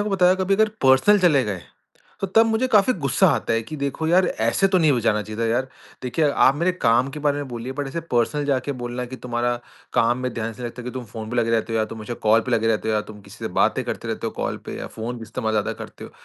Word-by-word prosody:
आपको 195 - 0
बताया 180 0 +5
कभी 190 +1 +1
अगर 220 +1 +3
पर्सनल 135 +11 +5
चले 155 -8 +4
गए, 95 -5 -4 0.6
तो 195 - 0
तब 225 +4 +4
मुझे 225 +3 +1
काफ़ी 215 +3 +4
गुस्सा 135 - +4
आता - - 0
है 115 0 +1
कि 155 +7 -8
देखो 140 +3 -2
यार 180 +1 +4
ऐसे 115 - +1
तो 185 -1 +3
नहीं 155 -3 +4
हो 125 - +1
जाना 105 -2 +1
चाहिए 110 +2 -7
था - - +1
यार। 125 +3 0 0.3
देखिए 145 +4 +1
आप 135 0 +4
मेरे 175 +3 +1
काम 120 -5 +2
के 150 - -7
बारे 145 -1 +1
में 140 -2 -5
बोलिए, 120 +2 -5
बट 140 0 -4
ऐसे 170 +4 -4
पर्सनल 125 +5 +1
जाके 140 0 0
बोलना 120 +1 -4
है 125 - -6
कि, 130 - -7
"तुम्हारा 120 0 -1 0.4
काम 120 +2 +2
में 125 -1 -3
ध्यान 115 0 -3
इसलिए 115 +2 -10
नहीं - - -3
लगता 125 +1 -10
कि 125 - -5
तुम 130 -1 -6
फ़ोन 110 +1 -8
पे 125 - -3
लगे 115 -1 +1
रहते 115 0 0
हो 115 - +1
या 110 - +2
तुम 110 - -8
मुझे 110 +3 -5
कॉल 115 +1 +6
पे 125 - -6
लगे 115 -1 +2
रहते 110 0 0
हो 110 - +1
या 105 - +2
तुम 105 -1 -11
किसी - - -14
से - - -1
बातें - - +2
करते - - -5
रहते - - -3
हो, - - -2
कॉल - - -3
पे - - -6
या - - -5
फ़ोन 120 +1 -4
इस्तेमाल 110 0 -3
ज़्यादा 105 -1 0
करते - - -10
हो।" - - -10
125 Hz, 290 wpm, -23 LUFS, 115-150 Hz, 0.6 s, कॉल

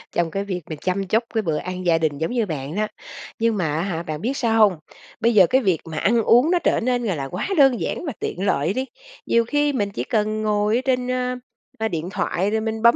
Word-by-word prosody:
trong 170 -1 +1
cái 195 +3 -2
việc 185 -3 -4
mà 155 - -4
chăm 190 +1 -1
chút 220 +5 +2
cái 225 - +1
bữa 160 -7 -1
ăn 185 +2 -5
gia 170 -2 +4
đình 155 -3 -1
giống 160 +7 -2
như 240 -3 +1
bạn 150 -3 -5
đó. 215 +1 0 0.5
Nhưng 225 -1 +1
mà, 160 -6 0
á 160 - 0
hả, 170 -3 -3
bạn 155 -2 -5
biết 265 +4 -2
sao 225 -2 +1
hông? 205 -5 +5 0.4
Bây 235 +1 +2
giờ 190 -5 +7
cái 260 +7 +3
việc 185 - +1
mà 160 -2 -7
ăn 230 +7 +3
uống 250 +10 +5
nó 355 - +3
trở - - +1
nên 245 0 0
là 200 -6 -1
là 140 -3 -4
quá 180 +8 -4
đơn 270 -4 +5
giản - - -3
và 290 - -3
tiện 190 - -3
lợi 165 -1 +1
đi. 260 +4 -2 0.4
Nhiều 235 0 +2
khi 290 +3 +1
mình 205 -6 0
chỉ 120 - -3
cần 215 - -1
ngồi 210 0 +1
ở 245 - +1
trên, 250 -1 0
a, 250 0 -1 0.4
a, 220 - 0
điện 170 -3 -4
thoại 195 0 -1
rồi 220 0 0
mình 220 0 -3
bấm 235 +1 +6
210 Hz, 265 wpm, -22 LUFS, 175-235 Hz, 0.5 s, giờ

